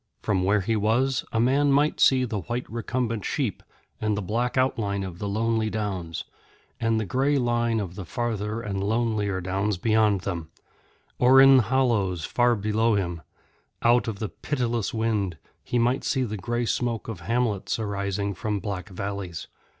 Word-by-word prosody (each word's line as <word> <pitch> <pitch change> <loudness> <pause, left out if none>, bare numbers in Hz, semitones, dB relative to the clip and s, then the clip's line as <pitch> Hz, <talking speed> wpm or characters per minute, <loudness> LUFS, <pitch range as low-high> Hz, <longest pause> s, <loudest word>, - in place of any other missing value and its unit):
From 95 -3 +1
where 100 +2 +3
he 110 +4 0
was, 120 +5 +1
a 115 - 0
man 140 +4 +3
might 145 +2 +2
see 130 -1 +5
the 110 -4 -3
white 120 +7 -4
recumbent 115 -1 -2
sheep - - -2 0.4
and 105 -1 0
the - - -1
black 120 +7 -1
outline 105 -6 0
of 90 -2 -7
the 100 - -3
lonely 110 +1 0
downs, 95 -7 -3 0.6
and 115 -1 +1
the 110 - -2
grey 135 +8 +1
line 120 -2 +1
of 95 -4 -4
the 95 - -6
farther 110 +1 -3
and 100 -3 -3
lonelier 105 -3 0
downs 95 +2 -1
beyond 110 0 +2
them; 85 -5 -4 0.7
or 130 +2 +7
in 135 0 +8
hollows 110 - +1
far 120 -1 +2
below 110 +2 +1
him, 85 -4 -2 0.6
out 120 +1 +4
of 110 -3 -3
the 110 0 -3
pitiless 120 -6 -2
wind, 110 -7 -1 0.3
he 120 - -1
might 125 +3 +2
see 130 - +1
the 110 -3 -3
grey 120 +5 -2
smoke 115 -1 -1
of 110 -6 -5
hamlets 110 +1 -1
arising 100 -2 -2
from 105 +1 -2
black 95 -2 -5
valleys. 100 -3 -5
110 Hz, 165 wpm, -25 LUFS, 100-120 Hz, 0.7 s, in